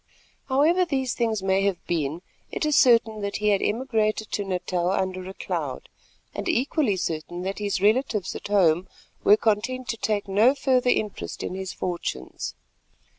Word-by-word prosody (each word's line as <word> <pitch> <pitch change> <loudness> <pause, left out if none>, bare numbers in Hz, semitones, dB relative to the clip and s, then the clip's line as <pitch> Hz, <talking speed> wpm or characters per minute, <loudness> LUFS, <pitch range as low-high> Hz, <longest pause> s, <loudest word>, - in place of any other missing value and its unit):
However 310 +7 +3
these 265 -7 -1
things 225 -4 -1
may 190 0 +2
have 195 -3 -1
been, 160 0 -2 0.3
it - - -2
is 300 -1 +2
certain 230 -4 +4
that 200 0 -3
he 210 +1 +1
had 200 -2 +3
emigrated 220 -2 0
to 205 - -1
Natal 180 -2 -1
under 185 -1 -2
a 190 - -9
cloud, - - -4 0.4
and - - -3
equally 275 - +1
certain 175 0 -3
that 195 +2 -3
his 205 -2 -1
relatives 215 -3 +1
at - - -6
home 185 -3 +3 0.4
were 210 - +7
content 230 +4 0
to 230 - -1
take 210 -2 -1
no 215 +8 +4
further 255 -3 +2
interest 210 -4 -2
in - - -4
his 190 0 -4
fortunes. 170 - -4
210 Hz, 165 wpm, -25 LUFS, 190-245 Hz, 0.4 s, were